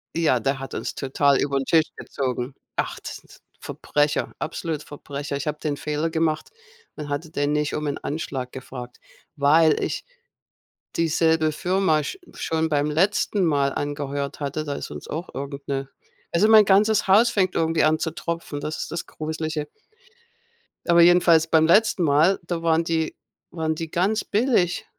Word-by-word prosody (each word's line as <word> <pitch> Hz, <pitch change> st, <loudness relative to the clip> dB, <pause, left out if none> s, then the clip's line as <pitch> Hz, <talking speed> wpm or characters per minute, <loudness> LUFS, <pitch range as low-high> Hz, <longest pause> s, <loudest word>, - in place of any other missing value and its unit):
Ja, 155 Hz, -7 st, +2 dB
der 135 Hz, +4 st, 0 dB
hat 135 Hz, -, -7 dB
uns -, -, -4 dB
total 140 Hz, 0 st, +2 dB
übern 140 Hz, -1 st, 0 dB
Tisch 160 Hz, -1 st, +3 dB
gezogen. 130 Hz, 0 st, -4 dB, 0.2 s
Ach, -, -, -2 dB
das -, -, -7 dB
sind -, -, -20 dB
so -, -, -16 dB, 0.2 s
Verbrecher, 145 Hz, 0 st, -1 dB
absolut 155 Hz, -1 st, -3 dB
Verbrecher. 145 Hz, -1 st, -6 dB
Ich 140 Hz, -, -5 dB
habe 150 Hz, 0 st, -3 dB
den 145 Hz, -2 st, -2 dB
Fehler 150 Hz, +2 st, -2 dB
gemacht 160 Hz, -1 st, -1 dB, 0.5 s
und 150 Hz, -1 st, -7 dB
hatte 150 Hz, +3 st, -3 dB
den 145 Hz, -1 st, -1 dB
nicht 150 Hz, 0 st, 0 dB
um 150 Hz, -, -3 dB
'nen 145 Hz, -1 st, -2 dB
Anschlag 135 Hz, -4 st, -4 dB
gefragt, 125 Hz, -2 st, -9 dB, 0.4 s
weil 155 Hz, +2 st, +4 dB
ich -, -, -3 dB, 0.9 s
dieselbe 160 Hz, -1 st, +2 dB
Firma 180 Hz, -1 st, +1 dB
sch 385 Hz, -, -5 dB, 0.2 s
schon 160 Hz, 0 st, -1 dB
beim 145 Hz, -1 st, +1 dB
letzten 190 Hz, +4 st, +1 dB
Mal 140 Hz, -3 st, +2 dB
angeheuert 145 Hz, -1 st, -3 dB
hatte. 145 Hz, +1 st, -3 dB
Da 145 Hz, -, -3 dB
ist -, -, -6 dB
uns -, -, -8 dB
auch 165 Hz, +4 st, -5 dB
irgend 140 Hz, +1 st, -6 dB
'ne 135 Hz, -1 st, -2 dB, 0.4 s
also 180 Hz, +5 st, +3 dB
mein 220 Hz, -2 st, +8 dB
ganzes 205 Hz, +1 st, +3 dB
Haus 220 Hz, +5 st, +6 dB
fängt 185 Hz, -3 st, +1 dB
irgendwie 165 Hz, 0 st, +2 dB
an 155 Hz, +1 st, +3 dB
zu 160 Hz, -, -2 dB
tropfen, 165 Hz, -3 st, -5 dB
das 155 Hz, +2 st, -4 dB
ist -, -, -8 dB
das 170 Hz, -, -4 dB
gruslige. 155 Hz, -1 st, -4 dB, 1.2 s
Aber 170 Hz, 0 st, +6 dB
jedenfalls 170 Hz, -2 st, +5 dB
beim 160 Hz, -1 st, +4 dB
letzten 210 Hz, +1 st, +4 dB
Mal, 155 Hz, +5 st, +4 dB
da 170 Hz, -1 st, -3 dB
waren 165 Hz, 0 st, +3 dB
die 165 Hz, -1 st, -1 dB, 0.4 s
waren 160 Hz, -2 st, -1 dB
die 165 Hz, 0 st, -5 dB
ganz 195 Hz, +7 st, 0 dB
billig 210 Hz, -, +1 dB
155 Hz, 170 wpm, -23 LUFS, 145-170 Hz, 1.2 s, mein